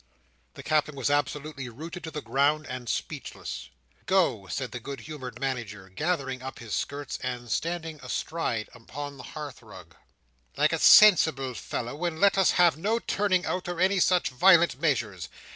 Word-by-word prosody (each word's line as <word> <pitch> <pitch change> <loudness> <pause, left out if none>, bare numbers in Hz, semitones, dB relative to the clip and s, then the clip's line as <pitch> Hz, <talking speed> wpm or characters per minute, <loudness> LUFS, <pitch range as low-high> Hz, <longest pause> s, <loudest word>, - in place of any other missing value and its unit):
The - - -9
Captain 155 -1 +1
was 135 +1 -1
absolutely 145 -1 -2
rooted 165 +9 -8
to - - -5
the 150 -2 -6
ground, 145 +3 +1
and 125 -2 -6
speechless— - - -5 0.4
"Go," 170 - +2
said 130 +4 -4
the 125 - -5
good 135 +1 -7
humoured 130 -5 -8
Manager, 115 -8 -4
gathering 135 - -2
up 130 +1 -7
his 115 -3 -8
skirts, 145 0 -3
and 120 -2 -5
standing 165 -2 -2
astride 125 -3 -3
upon 140 +4 -8
the - - -9 0.2
hearth 150 -2 -7
rug, - - -14 0.6
"like - - +3
a - - 0
sensible 160 -10 +6
fellow, 120 +6 -5
and 170 -2 -2
let 200 0 +5
us 195 -2 +4
have 175 -3 +5
no 210 +8 0
turning 195 -5 0
out, 180 -1 -2
or 175 -1 -4
any 190 +1 +3
such 180 0 +3
violent 170 +1 +5
measures. 150 -7 -1
145 Hz, 165 wpm, -27 LUFS, 125-170 Hz, 0.6 s, sensible